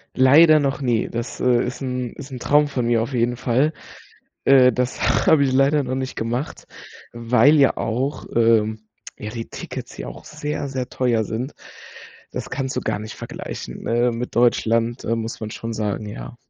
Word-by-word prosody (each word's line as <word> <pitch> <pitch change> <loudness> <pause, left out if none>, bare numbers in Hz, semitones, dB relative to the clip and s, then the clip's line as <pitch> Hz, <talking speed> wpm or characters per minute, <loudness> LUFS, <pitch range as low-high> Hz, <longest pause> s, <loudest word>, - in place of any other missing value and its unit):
Leider 155 +5 +7
noch 140 0 -1
nie, 120 -4 +1
das, 115 0 -5
äh, 125 -1 +3
ist 125 +3 -5
'n 125 -2 -3
ist 140 -1 -10
'n 125 - -6
Traum 145 +3 +3
von 125 -4 -2
mir 115 -1 +2
auf 115 +4 -4
jeden 120 0 0
Fall. 130 +6 +1 0.7
Äh, 130 -2 +6
das 125 +2 0
habe 145 -3 +5
ich 130 - 0
leider 140 +2 +3
noch 130 0 -3
nicht 130 0 -4
gemacht, 120 +5 -3 0.5
weil 120 +5 +4
ja 140 -2 +4
auch, 130 +6 -2
ähm 110 -2 +3 0.4
ja 105 - -6
die 115 0 -6
Tickets - - -7
hier - - -7
auch 65 +1 -12
sehr, 150 -1 -4
sehr 130 -2 -4
teuer 120 -3 +1
sind. 120 +7 -4 0.8
Das - - -5
kannst 135 -1 -3
du - - -1
gar - - -2
nicht 110 0 -7
vergleichen, - - -7
äh, 120 +1 +2
mit 120 +2 -5
Deutschland, 115 0 +2
äh, 115 - 0
muss 115 0 -4
man 110 -1 -5
schon 115 +2 -6
sagen, 105 -1 -3
ja. 110 - -8
125 Hz, 185 wpm, -22 LUFS, 115-135 Hz, 0.8 s, Leider